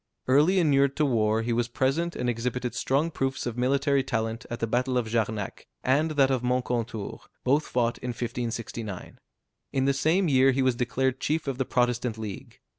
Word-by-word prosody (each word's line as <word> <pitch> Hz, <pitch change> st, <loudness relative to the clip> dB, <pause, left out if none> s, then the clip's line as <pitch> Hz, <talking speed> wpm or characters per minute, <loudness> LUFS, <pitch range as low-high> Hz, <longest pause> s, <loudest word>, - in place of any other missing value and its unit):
Early 150 Hz, +9 st, +4 dB
inured 140 Hz, -5 st, +3 dB
to 150 Hz, -, +2 dB
war, 110 Hz, -4 st, +2 dB
he 120 Hz, +1 st, -1 dB
was 120 Hz, 0 st, +1 dB
present 135 Hz, +8 st, 0 dB
and 125 Hz, -, -2 dB
exhibited 120 Hz, +1 st, -2 dB
strong 145 Hz, +5 st, 0 dB
proofs 135 Hz, -3 st, -2 dB
of 120 Hz, -2 st, -3 dB
military 140 Hz, +3 st, +2 dB
talent 115 Hz, -2 st, -3 dB
at 120 Hz, -, -4 dB
the -, -, 0 dB
battle 125 Hz, +3 st, 0 dB
of 120 Hz, -2 st, 0 dB
Jarnac, 110 Hz, -2 st, -2 dB, 0.2 s
and 145 Hz, +5 st, +2 dB
that 135 Hz, -1 st, +5 dB
of 130 Hz, -2 st, +1 dB
Moncontour, 125 Hz, -4 st, -2 dB, 0.2 s
both 145 Hz, +4 st, +2 dB
fought 120 Hz, -1 st, 0 dB
in -, -, -6 dB
1569. 115 Hz, -4 st, -5 dB, 0.5 s
In 135 Hz, -1 st, +1 dB
the 140 Hz, -, +3 dB
same 165 Hz, +7 st, +2 dB
year 135 Hz, -2 st, +4 dB
he 135 Hz, +1 st, +1 dB
was 130 Hz, -1 st, +3 dB
declared 125 Hz, +2 st, -1 dB
chief 155 Hz, +2 st, -1 dB
of 135 Hz, -1 st, -3 dB
the 130 Hz, -, +1 dB
Protestant 125 Hz, -2 st, 0 dB
League. 105 Hz, -3 st, -8 dB
125 Hz, 185 wpm, -27 LUFS, 115-135 Hz, 0.5 s, that